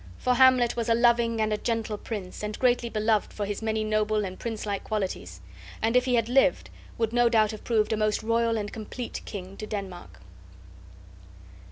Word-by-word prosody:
For 250 - +1
Hamlet 255 -2 +5
was 235 -1 -2
a 230 - +5
loving 235 -1 +3
and 215 0 +1
a 210 - -2
gentle 225 -2 -2
prince 205 -3 -6
and 210 0 -4
greatly 245 -2 +2
beloved 215 -1 +1
for 205 - -3
his 205 +1 -4
many 220 0 -1
noble 215 -1 0
and 185 -1 -7
princelike 215 -3 -4
qualities; 185 - -4 0.4
and 225 +2 0
if 250 0 +4
he 250 -1 +2
had 230 -1 +1
lived, 270 +2 +2 0.3
would 225 -1 -1
no 240 0 +4
doubt 220 -2 +3
have 215 - -9
proved 220 -2 +1
a - - 0
most 215 0 0
royal 230 0 +1
and 205 -1 -4
complete 225 +2 -6
king 190 -2 -7
to 215 - -6
Denmark. 195 -4 -7
220 Hz, 190 wpm, -27 LUFS, 210-235 Hz, 0.4 s, Hamlet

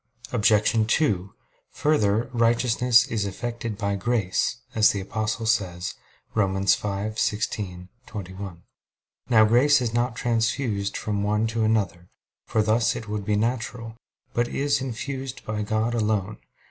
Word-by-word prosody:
Obj. 110 -1 +3
2: 100 - 0 0.4
Further, 115 -7 +2
righteousness 120 +1 +4
is 105 -3 -2
effected 115 +1 -4
by 100 -2 -1
grace, 105 0 0 0.2
as 110 -1 +5
the 100 - -1
Apostle 110 +3 -2
says 90 -5 0 0.4
(Rom. 95 -3 +1
5:16, 100 -1 -1 0.2
21). 95 -4 -7 0.7
Now 110 -3 +6
grace 130 +6 +5
is 120 -3 -2
not 120 0 0
transfused 115 -3 0
from 105 -1 -2
one 105 +2 +1
to 115 0 -1
another, 95 -6 0 0.4
for 110 - +2
thus 110 +2 +2
it 115 - -6
would 105 -1 -3
be 105 - +1
natural; 115 0 -2 0.4
but 120 0 +1
is 140 +1 0
infused 130 +1 -5
by 105 0 -2
God 110 +2 0
alone. 105 -3 -1
110 Hz, 130 wpm, -25 LUFS, 100-120 Hz, 0.7 s, Now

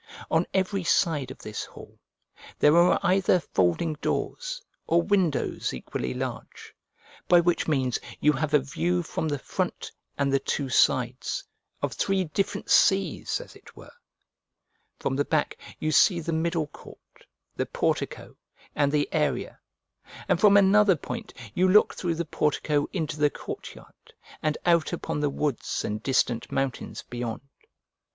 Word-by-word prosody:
On - - +2
every 190 0 0
side 155 -6 +1
of 130 - -9
this 105 -1 -6
hall - - -13 0.6
there 150 +2 +5
are 175 +1 +5
either 185 0 +3
folding 95 - 0
doors - - -2 0.3
or 170 +1 +3
windows 180 - 0
equally 65 0 -4
large, - - -6 0.5
by 175 - +7
which 170 0 +1
means 130 -5 +1 0.2
you 150 - +4
have 150 +1 0
a - - +6
view 175 +6 -1
from 160 - -3
the 145 -1 -1
front - - -4 0.3
and 140 -1 +1
the 135 - +4
two 140 -1 -2
sides 125 0 +1 0.4
of - - -1
three 195 -1 +1
different 185 +4 -2
seas, 190 -5 +3
as - - -11
it - - -17
were: - - -13 1.1
from 135 - -2
the 145 - +2
back 155 0 0 0.2
you 155 - -1
see 175 +4 +5
the 165 0 -3
middle 165 0 0
court, 145 - -16 0.3
the - - -2
portico, - - -2 0.4
and 145 -1 +1
the 145 -1 +1
area; - - -1 0.7
and - - +2
from 205 -1 +7
another 200 0 +5
point 155 - -6 0.2
you 185 +1 +3
look 210 +3 +5
through 170 -2 -2
the 170 +1 -2
portico 150 -1 0
into 155 -5 -3
the 150 0 +4
courtyard, - - -10 0.3
and 155 -1 0
out 170 -2 +3
upon - - -3
the 145 -1 +1
woods 140 -3 -2
and 105 +1 -3
distant 125 -3 0
mountains 135 -2 -3
beyond. 120 -2 -4
155 Hz, 150 wpm, -26 LUFS, 140-180 Hz, 1.1 s, by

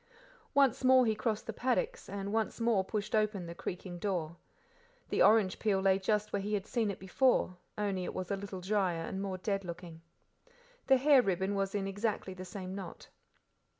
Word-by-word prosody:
Once 275 -3 +4
more 260 0 +6
he 220 - +2
crossed 215 0 -2
the - - -4
paddocks, 475 - -1
and 200 0 -4
once 225 +1 -1
more 230 -4 +2
pushed 210 +2 -4
open 215 -4 +1
the 170 - -6
creaking 175 0 -6
door. 170 -4 -2 0.7
The - - +1
orange 210 -4 +5
peel 205 -3 +2
lay 190 0 +3
just 210 +2 0
where 200 - 0
he 210 +2 -1
had 200 -1 -3
seen 225 -2 0
it 200 - -4
before, 190 0 +2 0.2
only 200 -3 -1
it - - -4
was 185 0 -4
a - - +2
little 195 -1 -7
drier 185 -4 0
and 190 +3 -4
more 195 -2 -3
dead 195 +1 -2
looking. 170 -2 -8 0.9
The 265 - +6
hair 275 0 +6
ribbon 190 -2 0
was 195 0 -1
in 200 -1 -1
exactly 200 -1 -2
the 185 0 -8
same 185 -1 -6
knot. 190 -3 -8
200 Hz, 190 wpm, -32 LUFS, 185-215 Hz, 0.9 s, more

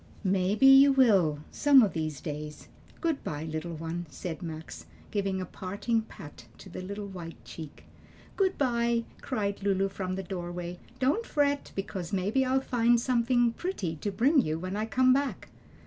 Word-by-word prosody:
"Maybe 195 +5 +2
you 270 +1 +9
will, 195 - +4
some 280 -3 +6
o' - - +4
these 155 -5 -4
days. 150 -1 -7 0.3
Good 325 -4 -1
by, 150 0 -4
little 160 +1 -4
one," 165 +2 -5
said 165 +3 -6
Max, 155 - -7 0.2
giving 195 -2 -1
a 185 - -3
parting 200 +6 -2
pat 145 - -12
to - - -12
the 185 - -7
little 200 +2 -5
white 175 -4 -8
cheek. 155 -3 -10 0.5
"Good 380 -1 +1
by," 235 -3 +1 0.2
cried 205 -6 -2
Lulu 195 0 +1
from 185 -1 -4
the 190 - -4
doorway; 175 -1 -5 0.2
"don't 275 - +1
fret, 285 -1 0
because 195 -3 -4
maybe 205 +7 +1
I'll 260 +1 +1
find 240 -2 +3
something 240 -1 +2
pretty 220 - -3
to 205 - -3
bring 260 +9 +4
you 155 -5 -2
when 185 +3 -4
I 215 +1 -2
come 255 +2 +4
back." 280 +1 -2
195 Hz, 165 wpm, -29 LUFS, 175-250 Hz, 0.5 s, you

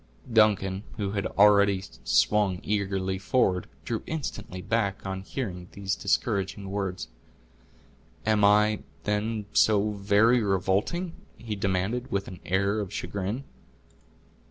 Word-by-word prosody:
Duncan, 100 -3 +3 0.2
who 100 -2 -2
had 100 -2 -1
already 100 -1 +4 0.2
swung 100 -4 +2
eagerly 95 -2 -1
forward, 95 -5 +1 0.2
drew 115 -2 -2
instantly 145 - -5
back 100 -1 -1
on 95 -1 -3
hearing 95 -5 -5
these 100 -1 -2
discouraging 100 -1 -1
words. 95 -9 -3 1.2
"Am 105 -1 +2
I, 105 +1 +4 0.2
then, 105 +1 -1
so 105 0 +4
very 105 +4 +3
revolting?" 100 - 0 0.2
he 110 -2 -5
demanded, 100 +5 -1
with 100 0 -1
an 90 - -9
air 100 +3 +1
of 100 -3 -4
chagrin. 100 +7 -3
100 Hz, 115 wpm, -27 LUFS, 95-105 Hz, 1.2 s, already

